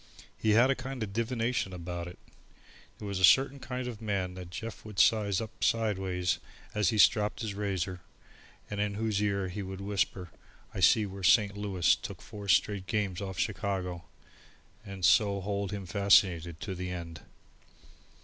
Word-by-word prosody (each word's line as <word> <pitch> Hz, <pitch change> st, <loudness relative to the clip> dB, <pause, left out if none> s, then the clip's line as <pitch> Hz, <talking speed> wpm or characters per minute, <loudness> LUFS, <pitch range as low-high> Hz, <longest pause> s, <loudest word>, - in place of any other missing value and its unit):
He 110 Hz, -, +1 dB
had 125 Hz, +5 st, +5 dB
a -, -, +1 dB
kind 130 Hz, -2 st, -5 dB
of 100 Hz, -2 st, -6 dB
divination 115 Hz, -3 st, -1 dB
about 85 Hz, 0 st, -5 dB
it. 90 Hz, -, -10 dB, 0.8 s
There 105 Hz, -, -7 dB
was 100 Hz, -2 st, -3 dB
a -, -, -2 dB
certain 135 Hz, +6 st, +5 dB
kind 125 Hz, -1 st, -5 dB
of 115 Hz, -3 st, -7 dB
man 100 Hz, -4 st, -2 dB
that 90 Hz, -1 st, -9 dB
Jeff 100 Hz, +2 st, -7 dB
would 105 Hz, -2 st, -10 dB
size 105 Hz, -2 st, +3 dB
up 110 Hz, -2 st, -6 dB
sideways 95 Hz, -5 st, 0 dB, 0.3 s
as 105 Hz, -4 st, +2 dB
he 110 Hz, -, -1 dB
stropped 105 Hz, +1 st, +3 dB
the 105 Hz, -2 st, -3 dB
razor, 95 Hz, -3 st, -3 dB, 0.7 s
and 105 Hz, 0 st, -3 dB
in 105 Hz, -1 st, -1 dB
whose 110 Hz, -1 st, -1 dB
ear 100 Hz, -2 st, 0 dB
he 100 Hz, +3 st, -5 dB
would 95 Hz, 0 st, -6 dB
whisper: 95 Hz, -2 st, -2 dB, 0.4 s
"I -, -, -5 dB
see 110 Hz, -, +5 dB
where 100 Hz, 0 st, -8 dB
Saint 100 Hz, +3 st, +4 dB
Louis 100 Hz, -4 st, -4 dB
has -, -, +7 dB
took -, -, -8 dB
four 105 Hz, -1 st, -9 dB
straight 95 Hz, +1 st, +2 dB
games 100 Hz, -2 st, -1 dB
off 95 Hz, -1 st, -5 dB
Chicago," 95 Hz, -4 st, -2 dB, 0.8 s
and 95 Hz, -3 st, -4 dB
so 100 Hz, +1 st, +4 dB
hold 100 Hz, 0 st, -3 dB
him 100 Hz, -2 st, -5 dB
fascinated 90 Hz, -3 st, +3 dB
to 95 Hz, -, -4 dB
the 90 Hz, 0 st, -5 dB
end. 85 Hz, -3 st, -6 dB
100 Hz, 175 wpm, -30 LUFS, 90-105 Hz, 0.8 s, has